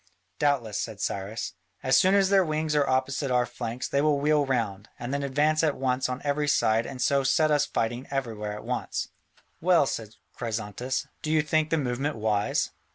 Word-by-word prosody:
"Doubtless," 125 -8 +1
said 110 -3 -4
Cyrus, 100 +2 -3 0.3
"as - - +3
soon 190 +2 +5
as 195 -1 +4
their 195 -1 +6
wings 155 -1 -1
are 145 -2 +2
opposite 130 +2 0
our 125 -1 +3
flanks, 120 0 -5
they 140 - +1
will 150 -1 +3
wheel 145 0 +2
round, 110 -6 -1
and 120 +3 -5
then 140 - 0
advance 145 +3 +2
at 150 -3 +1
once 130 0 0
on 125 +1 -4
every 145 +1 0
side 110 -4 +2
and 130 - -7
so 140 +2 +2
set 150 +3 +3
us 145 -1 +3
fighting 120 +3 -2
everywhere 115 -6 -3
at 105 - -8
once." - - -3 0.5
"Well," 175 -3 +4
said 110 -4 -4 0.2
Chrysantas, 115 +2 -3 0.2
"do 155 - -4
you 155 -1 +3
think 155 0 +1
the 165 - +2
movement 135 +1 -1
wise?" 105 -1 0
135 Hz, 190 wpm, -27 LUFS, 115-150 Hz, 0.5 s, their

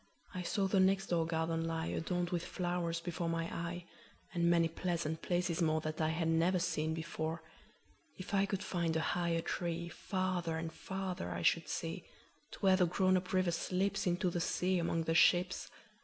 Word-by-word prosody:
I 185 - -3
saw 195 +3 0
the 190 0 +2
next 195 0 +3
door 165 -2 +2
garden 165 0 0
lie, 165 0 -2
Adorned 175 +1 -1
with 175 -1 -1
flowers, 175 -2 -2
before 170 0 -3
my 165 0 0
eye, 170 +1 -4 0.5
And 170 -1 +2
many 170 -1 +4
pleasant 165 -1 -2
places 175 -1 0
moreThat 155 -1 0
I 155 - +2
had 165 0 0
never 165 +3 +3
seen 160 -3 0
before. 160 0 -3 0.7
If 185 - -8
I 200 0 +3
could 195 0 -2
find 170 -3 -1
a - - +2
higher 170 -2 0
treeFarther 170 0 -2
and 160 0 -4
farther 190 - -4
I 85 -1 -4
should - - +3
see, - - -3 0.5
To - - -11
where 190 -1 +5
the 180 -2 +4
grown 185 +2 +3
up 185 0 -1
river 185 -2 +2
slipsInto 180 0 0
the 175 - -1
sea 180 +2 +1
among 165 -1 0
the 165 - 0
ships. 180 +2 +4
170 Hz, 175 wpm, -35 LUFS, 165-185 Hz, 0.7 s, where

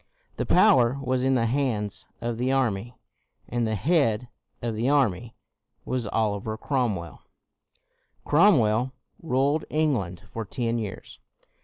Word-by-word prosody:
The - - -2
power 140 - +5
was 130 -1 -1
in 135 0 +3
the 115 -2 +2
hands 115 -5 -1
of 120 -1 -3
the 125 +2 +1
army, 120 -3 0 0.5
and 120 -1 -1
the 110 - -1
head 125 - +1 0.3
of 120 -1 -3
the 115 +4 0
army 120 -6 +1 0.5
was 125 -4 -2
Oliver 110 0 -1
Cromwell. 110 - -2 1.0
Cromwell 130 - +4 0.3
ruled 140 +1 +1
England 120 - -1
for 115 - -3
ten 115 +2 -2
years. 105 -4 -7
120 Hz, 125 wpm, -26 LUFS, 110-135 Hz, 1.0 s, power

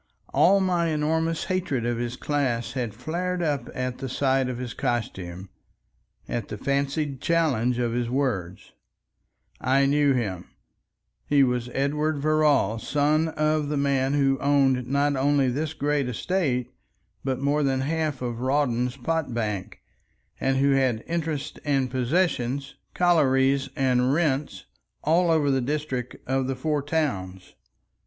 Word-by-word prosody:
All 195 +3 +5
my 175 -3 +1
enormous 160 +1 0
hatred 180 -10 -1
of 120 -1 -1
his 120 0 -3
class 130 -6 -1
had 120 -5 -3
flared 175 +8 -2
up 145 -6 -1
at 125 -1 -3
the 135 - -4
sight 135 0 +1
of 125 - -4
his 125 -1 -5
costume, 95 -7 -3 0.8
at - - -3
the - - -6
fancied 140 0 -1
challenge 145 -8 +1
of 120 -1 0
his 120 -1 -1
words. 115 -10 -2 0.9
I 135 +2 +3
knew 145 0 +3
him. 100 -8 -2 0.8
He 145 -1 +4
was 125 -1 0
Edward 150 +3 0
Verrall, 145 -7 +2
son 150 +5 +1
of 155 -1 0
the 150 - -1
man 140 -1 +1
who 135 -2 +2
owned 135 -3 +2
not 140 +2 +1
only 135 0 +2
this 150 +5 -2
great 145 -2 0
estate 125 - -1 0.5
but 130 -1 -1
more 145 +2 +1
than 135 -2 +1
half 150 -2 -1
of 120 -1 -4
Rawdon's 130 -2 0
pot 145 -2 -2
bank, 105 -5 -3 0.6
and 135 0 +1
who 140 +1 +3
had 130 -5 +1
interests 160 -4 -3
and 135 -4 0
possessions, 135 -1 0 0.2
collieries 135 -6 +3
and 125 -1 +2
rents, 140 - 0 0.4
all 170 +3 +3
over 155 -3 +3
the 135 -1 +1
district 130 -2 -3
of 130 0 0
the 135 - -1
Four 150 +3 -1
Towns. 100 - -3
135 Hz, 140 wpm, -25 LUFS, 125-150 Hz, 0.9 s, All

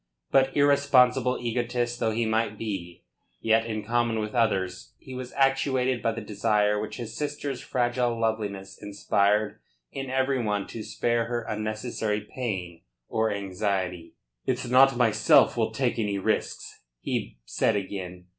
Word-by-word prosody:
But 135 0 +3
irresponsible 135 -3 +4
egotist 120 0 -1
though 110 - +1
he 115 +1 0
might 110 -1 0
be, 95 -6 -5 0.4
yet 115 0 +2
in 110 -2 -3
common 120 0 +1
with 105 -1 -3
others 95 -6 0
he 130 - -11
was 125 -1 -6
actuated 135 -2 +1
by 115 - +1
the 115 0 -5
desire 105 0 +1
which 105 - -5
his 115 -2 -6
sister's 145 -3 -3
fragile 120 -1 0
loveliness 105 -4 -3
inspired 105 0 +1 0.3
in 135 -1 -5
every 130 0 +1
one 105 -3 -1
to 115 - -6
spare 120 +1 0
her 120 0 -2
unnecessary 110 0 -2
pain 95 -7 -5 0.3
or 110 0 +1
anxiety. 95 -4 -3 0.3
"It's - - -1
not 130 +1 +5
myself 115 -4 +4
will - - +1
take - - -1
any 105 -2 0
risks," 95 - -2 0.2
he - - -3
said - - +1
again. 95 -2 -5
115 Hz, 145 wpm, -27 LUFS, 105-125 Hz, 0.4 s, not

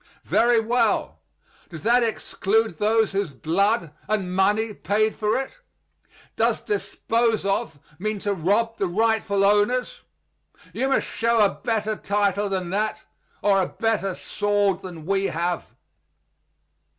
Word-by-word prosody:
Very 235 0 +3
well. 230 +3 0 0.5
Does 165 -3 -9
that 240 +3 +4
exclude 225 -1 0
those 220 +1 +2
whose 195 -7 -2
blood 175 - 0 0.2
and 195 -4 -1
money 210 +3 +2
paid 215 +2 0
for 215 -1 0
it? 270 - -5 0.8
Does - - +1
"dispose 230 - 0
of" 195 -5 -1 0.2
mean 215 +2 -2
to 205 - 0
rob 210 +6 0
the 195 - 0
rightful 205 0 +1
owners? 210 +5 +1 0.7
You 265 - -1
must 270 - +2
show 230 +1 +1
a - - +3
better 220 -2 -2
title 205 0 0
than 185 -2 -2
that, 215 +2 -1 0.4
or 195 -2 +4
a 185 - 0
better 215 -4 -1
sword 205 -2 0
than 170 -4 -9
we 195 +1 +1
have. 175 0 -2
205 Hz, 130 wpm, -24 LUFS, 195-225 Hz, 0.8 s, that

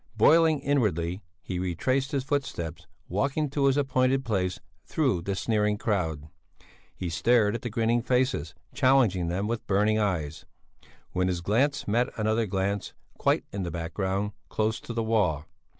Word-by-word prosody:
Boiling 160 +6 +5
inwardly 100 - 0 0.2
he 90 -2 -4
retraced 130 - 0
his 140 -3 0
footsteps, 90 - -3 0.2
walking 140 - 0
to 140 -1 +1
his 135 0 +3
appointed 130 -1 +2
place 95 -6 -1 0.2
through 85 - 0
the 100 +3 -2
sneering 105 0 +1
crowd; 80 -9 -1 0.7
he 90 - -4
stared 105 +5 +3
at 115 - -3
the 120 - -4
grinning 115 +1 +1
faces, 125 - 0 0.2
challenging 125 - +3
them 90 +4 -1
with 115 +1 -3
burning 105 +2 +2
eyes, 80 -7 -1 0.7
when 90 0 0
his 90 -2 -1
glance 125 +10 +1
met 120 +5 +2
another 110 +1 +1
glance, 100 +1 -2 0.2
quite - - +2
in 100 - -4
the 90 - -2
background, 95 +4 -2 0.2
close 110 +1 0
to - - -8
the 115 -1 -1
wall. 95 -9 +1
105 Hz, 150 wpm, -27 LUFS, 90-130 Hz, 0.7 s, Boiling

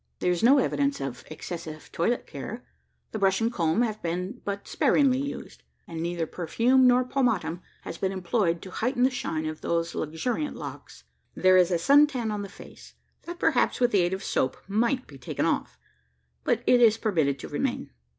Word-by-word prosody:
There 180 - +1
is 175 - -1
no 260 +5 +6
evidence 280 +1 +1
of 135 -2 -5
excessive 155 -1 -8
toilet 230 +9 0
care. 205 - -7 0.5
The 220 - -4
brush 195 -1 +3
and 230 +1 0
comb 170 +4 +1
have 215 -2 -3
been 180 +8 -4
but 200 0 -4
sparingly 265 -3 +3
used; 280 +1 -6 0.3
and 165 -1 -6
neither 170 0 -2
perfume 235 +11 +2
nor 250 0 +4
pomatum 230 -10 0 0.2
has - - -7
been 190 - 0
employed 180 -2 0
to 185 - -9
heighten 250 +4 0
the 260 - +4
shine 160 -10 -3
of 155 0 -5
those 170 0 -1
luxuriant 235 - -2
locks. - - -9 0.3
There 185 0 +4
is 180 -1 +5
sun 290 +5 +7
tan 245 -6 -3
on 210 -1 -3
the 200 - -6
face, - - -14 0.3
that, 345 0 -6
perhaps 310 -7 +2
with 245 -1 +3
the 200 - +4
aid 175 +1 0
of 190 - -4
soap, 130 - 0
might 235 +6 0
be 140 -2 -14
taken 120 - -2
off; - - -1 0.7
but - - 0
it 245 -1 +5
is 225 -2 +6
permitted 160 - +1
to - - -8
remain. - - -3
200 Hz, 190 wpm, -26 LUFS, 170-245 Hz, 0.7 s, sun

